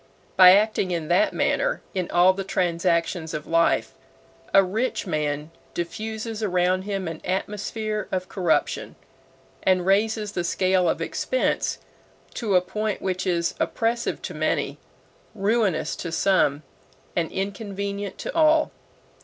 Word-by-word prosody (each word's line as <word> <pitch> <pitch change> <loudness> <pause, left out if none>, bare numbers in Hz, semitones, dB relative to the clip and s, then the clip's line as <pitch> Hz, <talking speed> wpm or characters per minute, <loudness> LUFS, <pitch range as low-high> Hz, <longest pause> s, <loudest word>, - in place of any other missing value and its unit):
By 185 -1 +9
acting 205 -1 +2
in 165 -3 -3
that 315 0 +3
manner - - 0
in 185 -2 -2
all 180 +2 +5
the 195 +1 -4
transactions 170 -2 0
of 150 - -5
life, 165 0 +2 0.6
a 195 - +6
rich 220 +7 -2
man 150 -2 -2 0.2
diffuses 220 +5 -4
around 185 -1 +1
him 195 -3 -3
an 165 -1 -6
atmosphere 210 +2 -3
of 185 -1 -2
corruption, 175 -5 0 0.7
and 185 -2 +2
raises 210 +2 +1
the 175 -4 -2
scale 185 +1 +2
of - - -1
expense - - -1 0.6
to 210 -5 -1
a 180 - +6
point 210 +3 -3
which 185 0 -2
is 170 -2 +1
oppressive 235 +1 -1
to - - -5
many, - - -1 0.6
ruinous 205 -3 +1
to 170 - -5
some, 165 -4 +2 0.5
and 170 -2 0
inconvenient 200 0 -4
to - - -5
all. 315 -1 +4
190 Hz, 130 wpm, -24 LUFS, 175-215 Hz, 0.7 s, By